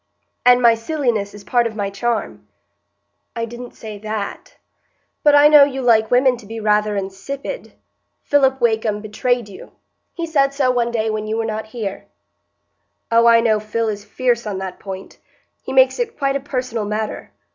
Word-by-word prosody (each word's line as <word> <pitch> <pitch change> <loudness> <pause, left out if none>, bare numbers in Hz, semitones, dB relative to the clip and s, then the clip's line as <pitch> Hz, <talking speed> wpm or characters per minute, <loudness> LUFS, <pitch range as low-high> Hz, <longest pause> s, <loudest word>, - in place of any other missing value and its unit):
"And 250 0 +5
my 235 -1 +7
silliness 230 -5 -2
is 205 - -11
part 240 +3 +1
of 220 - -8
my 200 -2 -3
charm?" 225 +3 -3 0.9
"I 230 0 -2
didn't 240 +1 -10
say 215 -2 -9
that." 215 -1 -6 0.6
"But 295 -1 +5
I 290 +1 +8
know 300 -1 +8
you 270 -2 -1
like 220 -2 +4
women 250 0 +3
to 225 -3 -14
be 225 +1 -6
rather 210 -1 +1
insipid. 200 - -6 0.5
Philip 265 -2 +2
Wakem 220 -3 0
betrayed 235 +2 -1
you; 195 - -13 0.4
he 335 - -3
said 275 -4 +1
so 265 -3 +2
one 240 -1 0
day 220 -2 -1
when 215 0 -3
you 220 +1 -2
were 225 - -1
not 220 0 -4
here." 215 -4 -6 1.0
"Oh, 230 0 +5
I 230 0 +6
know 220 -2 +2
Phil 220 +1 -2
is 205 -1 -5
fierce 240 0 -1
on 200 -2 -3
that 190 -1 -6
point; 190 -1 -9 0.4
he - - -7
makes 260 - +4
it 470 -1 -3
quite 275 -1 0
a - - 0
personal 255 -5 -3
matter. 215 +1 -4
230 Hz, 180 wpm, -19 LUFS, 215-260 Hz, 1.0 s, I